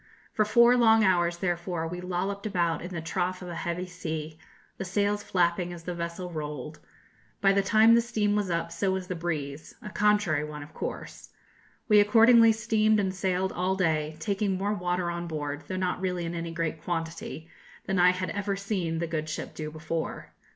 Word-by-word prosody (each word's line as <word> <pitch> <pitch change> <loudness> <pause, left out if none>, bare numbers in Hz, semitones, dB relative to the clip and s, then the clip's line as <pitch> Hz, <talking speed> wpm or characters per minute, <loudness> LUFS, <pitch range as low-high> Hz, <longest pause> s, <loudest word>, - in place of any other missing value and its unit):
For 215 - +2
four 235 +3 +6
long 225 -2 +5
hours, 175 -3 +2
therefore, 175 -2 -2
we 180 +2 -5
lolloped 190 +3 -3
about 175 -5 0
in 180 - -7
the 170 -3 -4
trough 180 +3 -2
of 180 - -7
a - - -5
heavy 175 +2 -3
sea, 160 -3 -6 0.4
the - - -2
sails 205 +2 0
flapping 175 -2 0
as 170 -1 -9
the 180 - -4
vessel 170 +1 -5
rolled. 150 -1 -6 0.6
By 195 0 +4
the 200 - +3
time 220 +3 +5
the 235 - +6
steam 215 -3 0
was 205 -3 0
up 170 -1 -1
so 180 +4 -1
was 190 -1 -2
the 185 0 -4
breeze 155 -3 -4
a 210 - -9
contrary 205 -8 +2
one, 150 -1 -6
of 145 - -14
course. - - -6 0.6
We 210 -2 +6
accordingly 230 +2 +7
steamed 215 -1 +2
and 190 -2 0
sailed 190 0 -1
all 185 +2 0
day, 155 -4 0
taking 200 -2 -1
more 200 +2 0
water 180 -2 -1
on 170 0 -4
board, 145 -2 -4
though 185 - -3
not 180 -1 -1
really 180 -2 -1
in 165 - -4
any 170 0 -4
great 165 -1 -3
quantity, 165 -3 -4 0.4
than 190 -1 0
I 180 0 +7
had 185 0 -1
ever 200 0 -2
seen 195 -5 -2
the 170 - -1
good 155 -2 -3
ship 155 - -5
do 155 -1 -5
before. 160 +1 -5
180 Hz, 195 wpm, -28 LUFS, 165-200 Hz, 0.6 s, accordingly